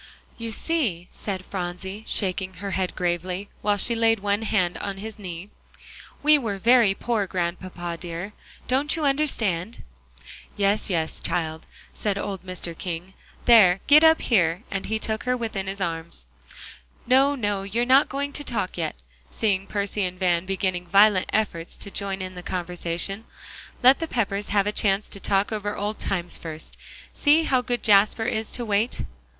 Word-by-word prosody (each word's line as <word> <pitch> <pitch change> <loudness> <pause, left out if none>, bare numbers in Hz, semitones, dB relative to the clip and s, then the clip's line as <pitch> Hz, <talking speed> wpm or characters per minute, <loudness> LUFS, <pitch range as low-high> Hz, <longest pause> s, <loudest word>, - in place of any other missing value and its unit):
"You 230 -1 -5
see," 220 - -1
said 190 -3 -5
Phronsie, 190 +2 -5
shaking 185 -1 -1
her 200 +2 -5
head 190 -1 -1
gravely, 180 +2 -2
while 205 -1 +2
she 235 - +2
laid 225 -1 +3
one 205 +1 0
hand 185 -5 0
on 200 -1 -4
his 220 +2 -7
knee, 185 0 -7 0.7
"we 300 0 +6
were 215 -6 -3
very 230 -1 +5
poor, 220 -2 -1
Grandpapa 175 -1 -3
dear. 175 +4 -6 0.3
Don't 275 +5 +2
you 315 -3 -1
understand?" 230 - 0 0.7
"Yes, 205 +2 +2
yes, 165 -4 -1
child," 160 -2 -3 0.3
said 205 -2 -1
old 195 -2 -4
Mr. 185 -2 -5
King; 175 +2 -5 0.3
"there, 200 -6 +7
get 300 +2 +7
up 320 0 +6
here," 180 -4 +2
and 195 -1 -3
he 220 - 0
took 220 0 -2
her 250 0 +1
within 220 -5 -3
his 195 +1 -4
arms. 165 - -4 0.8
"No, 270 +3 +4
no, 205 -6 -1
you're 210 +5 -1
not 265 +3 +5
going 280 +1 -3
to 290 - -2
talk 205 -9 -2
yet," 160 -2 -2 0.3
seeing 195 -3 0
Percy 205 0 -1
and 185 0 -2
Van 180 -1 +1
beginning 185 -2 -1
violent 200 +1 +5
efforts 175 -6 -1
to 200 - -6
join 195 -1 -3
in 185 0 -6
the 180 - -8
conversation. 180 +3 -3 0.6
"Let 260 +2 +7
the 330 - -2
Peppers 205 -6 -1
have 200 -1 +2
a 210 - 0
chance 200 -1 +2
to 200 - -7
talk 195 +1 +1
over 205 -1 -3
old 210 +1 -3
times 175 -3 -1
first. 160 -1 -7 0.4
See 305 +2 +4
how 260 -5 +2
good 245 -1 -3
Jasper 210 +1 +4
is 220 0 -1
to 240 - -3
wait." 215 +3 0
200 Hz, 165 wpm, -24 LUFS, 180-225 Hz, 0.8 s, there